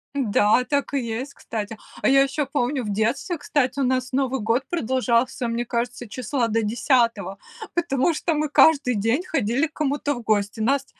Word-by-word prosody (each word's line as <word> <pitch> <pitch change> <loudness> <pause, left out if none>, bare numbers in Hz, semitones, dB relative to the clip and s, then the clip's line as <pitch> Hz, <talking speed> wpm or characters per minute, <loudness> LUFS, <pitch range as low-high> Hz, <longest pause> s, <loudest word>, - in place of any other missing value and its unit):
Да, 235 -2 +3
так 285 0 -1
и 280 - +2
есть, 245 +4 -4
кстати. 220 -1 -5 0.2
А - - +2
я 275 0 +6
еще 275 +2 -1
помню 265 -1 -1
в 210 - -4
детстве, 240 - -1
кстати, 280 -2 -1
у - - +2
нас 255 0 0
Новый 265 -1 0
год 230 +5 +1
продолжался, 255 -4 0
мне 235 +1 -2
кажется, 240 +1 -3
числа 250 +2 -1
до 225 +1 +1
10-го, 230 -3 +1 0.4
потому 335 -2 +1
что 330 +2 -1
мы 300 -1 -1
каждый 285 -5 +4
день 225 - +1
ходили 275 - 0
к 310 - -27
кому-то 290 -1 -1
в 240 - -7
гости. 210 -1 0
Нас 270 +5 +1
255 Hz, 180 wpm, -23 LUFS, 230-280 Hz, 0.4 s, я